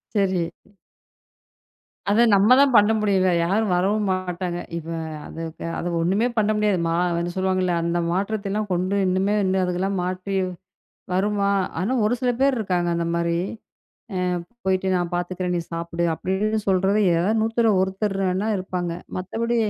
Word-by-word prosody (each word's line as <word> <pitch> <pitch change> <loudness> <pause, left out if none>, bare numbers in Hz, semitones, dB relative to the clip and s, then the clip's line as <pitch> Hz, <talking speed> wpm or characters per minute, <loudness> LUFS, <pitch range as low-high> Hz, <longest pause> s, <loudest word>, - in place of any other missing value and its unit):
சரி. 185 -4 +1 1.6
அத 210 +3 +4
நம்ம 205 +5 +6
தான் 280 -2 +5
பண்ண 210 0 +6
முடியும்ல. 190 -3 +2
யாரும் 200 +2 +1
வரவும் 200 +4 +1
மாட்டாங்க. 180 -1 -3 0.2
இப்ப 165 0 -6 0.3
அதுக்கு 165 0 -7
அது 175 - -2
ஒண்ணுமே 195 +8 +2
பண்ண 215 0 +3
முடியாது. 210 -2 +2
மா 165 - 0 0.2
வந்து 175 +1 -2
சொல்லுவாங்கள்ள 185 -1 +1
அந்த 170 +1 0
மாற்றத்தைலாம் 205 +2 -2
கொண்டு 185 +2 0
இன்னுமே 190 +2 +1
இன்னு 190 0 +1
அதுகெலாம் 185 +2 -1
மாற்றி, 185 +2 -3 0.8
வருமா? 200 +1 +1 0.3
ஆனா 200 +7 0
ஒரு 235 - +2
சில 250 - +3
பேர் 275 -1 +3
இருக்காங்க 180 -5 0
அந்த 170 0 -1
மாரி. 170 0 0 0.8
அ - - -1 0.5
போயிட்டு 190 0 +1
நான் 175 -1 -2
பாத்துக்குறேன், 180 0 -2
நீ - - -1
சாப்புடு. 170 +1 -2
அப்டின்னு 205 +6 -1
சொல்றதே 195 +3 +2 0.2
ஏதா 180 +6 +1
நூத்துல 225 0 +2
ஒருத்தர் 195 +1 -1
வேணா 190 +4 0
இருப்பாங்க.மத்தபடி 185 +5 -3
190 Hz, 140 wpm, -23 LUFS, 180-205 Hz, 1.6 s, நம்ம